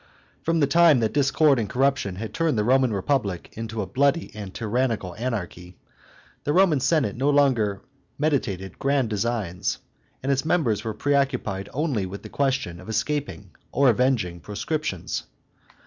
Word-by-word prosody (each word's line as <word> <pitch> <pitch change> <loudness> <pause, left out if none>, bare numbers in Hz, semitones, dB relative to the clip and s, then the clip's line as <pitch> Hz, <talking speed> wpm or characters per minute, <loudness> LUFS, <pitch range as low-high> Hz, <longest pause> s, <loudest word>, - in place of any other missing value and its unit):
From 165 0 +1
the - - +5
time 155 -1 +5
that 110 -1 0
discord 145 -1 +3
and 105 -3 -2
corruption 135 -6 +1
had 110 +3 -6
turned 165 -7 +1
the 105 - +2
Roman 130 +1 +3
Republic 100 -3 -1
into 115 -1 -4
a - - -4
bloody 140 - +1
and 105 -3 -7
tyrannical 115 -4 -1
anarchy, 90 -7 -5 0.7
the 145 - 0
Roman 175 -5 +4
Senate 130 -5 +1
no 135 +4 +1
longer 125 -9 +2 0.3
meditated 115 - -1
grand 135 -4 +1
designs, 105 -4 -1 0.5
and 135 - +1
its 135 -1 +1
members 155 - +1
were 110 -2 -4
preoccupied 125 -7 0
only 135 - -1
with 100 +2 -8
the - - -9
question 130 -11 -1
of 95 - -11
escaping 125 -5 -2 0.2
or 140 -1 +4
avenging 110 -8 0
proscriptions. 105 - -3
125 Hz, 150 wpm, -24 LUFS, 100-140 Hz, 0.7 s, the